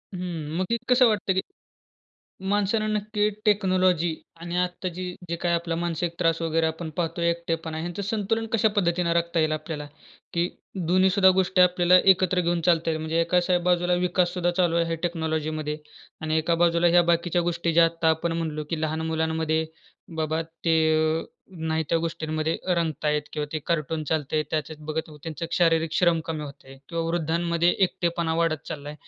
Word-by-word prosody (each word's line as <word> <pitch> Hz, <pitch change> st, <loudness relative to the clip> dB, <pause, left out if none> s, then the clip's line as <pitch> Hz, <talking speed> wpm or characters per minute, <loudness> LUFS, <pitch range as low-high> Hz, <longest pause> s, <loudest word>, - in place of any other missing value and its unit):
हं, 165 Hz, -4 st, -4 dB
मग 185 Hz, -, -2 dB
एक 235 Hz, -, -1 dB
कसं 250 Hz, 0 st, +6 dB
वाटते, 205 Hz, -3 st, +1 dB
की 190 Hz, -, +1 dB, 1.1 s
माणसांना 205 Hz, +2 st, +1 dB
नक्की 210 Hz, 0 st, 0 dB, 0.2 s
टेक्नॉलॉजी 185 Hz, -5 st, +2 dB, 0.3 s
आणि 170 Hz, +1 st, -4 dB
आत्ता 180 Hz, +1 st, -1 dB
जी 180 Hz, +1 st, -6 dB, 0.2 s
जे 170 Hz, -, -2 dB
काही 170 Hz, 0 st, 0 dB
आपला 170 Hz, 0 st, -1 dB
मानसिक 170 Hz, 0 st, -2 dB
त्रास 165 Hz, -1 st, +1 dB
वगैरे 165 Hz, 0 st, +1 dB
आपण 160 Hz, 0 st, -4 dB
पाहतोय, 170 Hz, 0 st, 0 dB
एकटेपणा 165 Hz, -1 st, -3 dB
ह्यांचं 175 Hz, +4 st, -4 dB
संतुलन 220 Hz, +2 st, -1 dB
कशा 220 Hz, -1 st, +3 dB
पद्धतीनं 170 Hz, -3 st, +1 dB
राखता 170 Hz, 0 st, 0 dB
येईल 155 Hz, 0 st, +1 dB
आपल्याला? 155 Hz, -1 st, -4 dB, 0.5 s
की 170 Hz, +1 st, +1 dB, 0.4 s
दोन्ही 185 Hz, +2 st, +4 dB
सुद्धा 190 Hz, 0 st, +5 dB
गोष्टी 185 Hz, 0 st, +2 dB
आपल्याला 180 Hz, 0 st, +5 dB
एकत्र 185 Hz, -1 st, +3 dB
घेऊन 175 Hz, -1 st, 0 dB
चालता 165 Hz, -2 st, +3 dB
येईल? 160 Hz, -1 st, -2 dB
म्हणजे 160 Hz, +1 st, 0 dB
एकाच 175 Hz, +2 st, +1 dB
बाजूला 180 Hz, 0 st, +2 dB
विकास 180 Hz, 0 st, +1 dB
सुद्धा 175 Hz, -1 st, +1 dB
चालू 175 Hz, -3 st, +2 dB
आहे 165 Hz, -1 st, +1 dB
टेक्नॉलॉजीमध्ये 155 Hz, -3 st, -2 dB, 0.4 s
आणि 155 Hz, 0 st, 0 dB
एका 160 Hz, +2 st, +1 dB
बाजूला 170 Hz, 0 st, +3 dB
ह्या 175 Hz, +1 st, +6 dB
बाकीच्या 175 Hz, +1 st, +1 dB
गोष्टी 170 Hz, -1 st, -1 dB
ज्या 165 Hz, +1 st, +6 dB
आत्ता 165 Hz, 0 st, +1 dB
आपण 165 Hz, +1 st, -1 dB
म्हणालो, 160 Hz, -2 st, -3 dB
की 165 Hz, -2 st, -2 dB
लहान 155 Hz, 0 st, -1 dB
मुलांमध्ये 160 Hz, 0 st, 0 dB, 0.5 s
बाबा 160 Hz, 0 st, -1 dB, 0.2 s
ते 165 Hz, -, +3 dB, 0.5 s
अ, -, -, -8 dB, 0.3 s
नाही 160 Hz, -1 st, -1 dB
त्या 165 Hz, -, +2 dB
गोष्टींमध्ये 160 Hz, -1 st, -2 dB
अ, 185 Hz, -, +2 dB
रंगतायत 150 Hz, -2 st, 0 dB
किंवा 150 Hz, -1 st, -2 dB
ते 155 Hz, -, -1 dB
कार्टून 155 Hz, -1 st, -1 dB
चालतंय 155 Hz, 0 st, 0 dB
त्याच्यात 155 Hz, 0 st, -3 dB
बघत 155 Hz, +1 st, -3 dB
त्यांचं 165 Hz, +1 st, -5 dB
शारीरिक 165 Hz, -2 st, +2 dB
श्रम 170 Hz, -1 st, +3 dB
कमी 160 Hz, -2 st, -4 dB
होतंय 135 Hz, -1 st, -12 dB
किंवा 165 Hz, -1 st, -2 dB
वृद्धांमध्ये 170 Hz, +1 st, 0 dB, 0.2 s
एकटेपणा 170 Hz, -2 st, -2 dB
वाढत 165 Hz, -2 st, 0 dB
चाललाय. 145 Hz, 0 st, -6 dB
170 Hz, 170 wpm, -25 LUFS, 160-180 Hz, 1.1 s, कसं